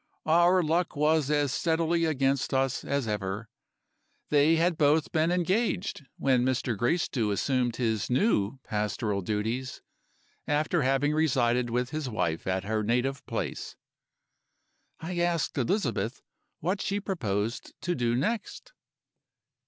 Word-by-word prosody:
Our 175 Hz, +3 st, +4 dB
luck 165 Hz, +3 st, 0 dB
was 150 Hz, 0 st, +2 dB
as 145 Hz, -2 st, +2 dB
steadily 165 Hz, +1 st, +1 dB
against 135 Hz, -3 st, 0 dB
us 135 Hz, -1 st, 0 dB
as 140 Hz, -3 st, -1 dB
ever. 105 Hz, +1 st, -3 dB, 0.8 s
They 150 Hz, +2 st, +4 dB
had 170 Hz, +1 st, +2 dB
both 150 Hz, 0 st, +2 dB
been 160 Hz, +1 st, +2 dB
engaged 185 Hz, -, 0 dB
when 130 Hz, -2 st, +2 dB
Mr. 130 Hz, -2 st, 0 dB
Gracedieu 120 Hz, -, 0 dB
assumed 120 Hz, +3 st, 0 dB
his 110 Hz, -4 st, -1 dB
new 125 Hz, -, +1 dB
pastoral 105 Hz, -1 st, -2 dB
duties, 110 Hz, +6 st, -3 dB, 0.6 s
after 150 Hz, +3 st, +1 dB
having 135 Hz, +2 st, +2 dB
resided 125 Hz, -6 st, +2 dB
with 125 Hz, +2 st, -1 dB
his 155 Hz, -4 st, -3 dB
wife 85 Hz, -8 st, -2 dB
at 95 Hz, 0 st, 0 dB
her 110 Hz, +2 st, -1 dB
native 125 Hz, +5 st, 0 dB
place. -, -, -4 dB, 1.2 s
"I 175 Hz, +2 st, -4 dB
asked 175 Hz, -2 st, 0 dB
Elizabeth 120 Hz, -, -1 dB, 0.4 s
what 185 Hz, +5 st, -1 dB
she 200 Hz, +1 st, -1 dB
proposed 115 Hz, -, -3 dB
to 175 Hz, -, -1 dB
do 120 Hz, -5 st, 0 dB
next. 230 Hz, -, -3 dB
135 Hz, 125 wpm, -28 LUFS, 115-165 Hz, 1.2 s, Our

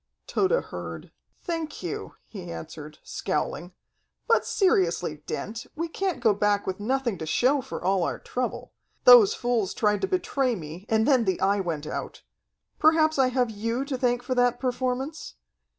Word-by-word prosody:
Tode 380 Hz, -, +1 dB
heard. -, -, -8 dB, 0.3 s
"Thank 330 Hz, -3 st, -4 dB
you," -, -, -5 dB
he 180 Hz, -5 st, -8 dB
answered, 155 Hz, -2 st, -8 dB
scowling. 175 Hz, +1 st, -3 dB, 0.5 s
"But 460 Hz, -, +3 dB
seriously, 180 Hz, -, +1 dB
Dent, 225 Hz, +3 st, -5 dB
we 335 Hz, +2 st, -2 dB
can't 365 Hz, -4 st, -2 dB
go 220 Hz, -3 st, +5 dB
back 205 Hz, 0 st, +1 dB
with 190 Hz, +1 st, -3 dB
nothing 240 Hz, -2 st, -1 dB
to 160 Hz, -, -5 dB
show 265 Hz, -, +2 dB
for 260 Hz, -, -7 dB
all 190 Hz, +1 st, +2 dB
our -, -, -1 dB
trouble. 250 Hz, 0 st, -4 dB, 0.3 s
Those 470 Hz, -4 st, +8 dB
fools 240 Hz, -, -1 dB
tried 210 Hz, -2 st, +1 dB
to -, -, +1 dB
betray 275 Hz, -9 st, 0 dB
me, 170 Hz, +3 st, -9 dB
and 220 Hz, 0 st, +2 dB
then 260 Hz, -5 st, +4 dB
the 190 Hz, -2 st, 0 dB
Eye 200 Hz, +1 st, +2 dB
went 165 Hz, -5 st, -3 dB
out. -, -, -6 dB, 0.6 s
Perhaps 315 Hz, -1 st, +4 dB
I 265 Hz, -, +5 dB
have 250 Hz, -2 st, 0 dB
you 230 Hz, +5 st, -2 dB
to 280 Hz, -1 st, -3 dB
thank 245 Hz, -1 st, 0 dB
for 255 Hz, -, -1 dB
that 245 Hz, -1 st, +2 dB
performance? 265 Hz, -, -3 dB
245 Hz, 165 wpm, -26 LUFS, 195-280 Hz, 0.6 s, Those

